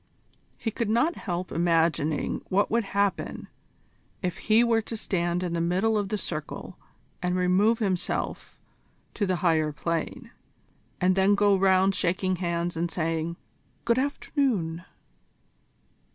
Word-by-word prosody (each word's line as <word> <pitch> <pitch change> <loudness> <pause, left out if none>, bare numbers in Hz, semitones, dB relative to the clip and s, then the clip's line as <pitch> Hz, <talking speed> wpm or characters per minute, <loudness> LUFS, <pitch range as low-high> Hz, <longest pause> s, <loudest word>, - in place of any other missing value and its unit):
He 225 - -3
could 225 0 -2
not 240 +10 +2
help 180 -1 -4
imagining 165 -3 +1
what 200 +2 +2
would 230 -1 +2
happen 200 0 -1 0.8
if 180 -2 -2
he 220 +2 +4
were 230 -1 +3
to 225 +1 -6
stand 175 -3 -1
in 175 -2 -2
the 170 - 0
middle 185 +6 +1
of 205 -2 0
the 215 - -1
circle 155 -6 -5 0.5
and 180 0 0
remove 185 +5 +3
himself 190 -5 -2 0.6
to 205 - -1
the 185 - +1
Higher 155 -2 +3
Plane, 170 - -3 0.7
and 185 0 +3
then 195 +1 +4
go 205 0 +4
round 190 0 +4
shaking 185 0 0
hands 170 -1 -2
and 170 +1 -1
saying, 165 0 -2 0.5
"Good 235 +1 +3
afternoon." 235 - -1
185 Hz, 135 wpm, -27 LUFS, 170-210 Hz, 0.8 s, he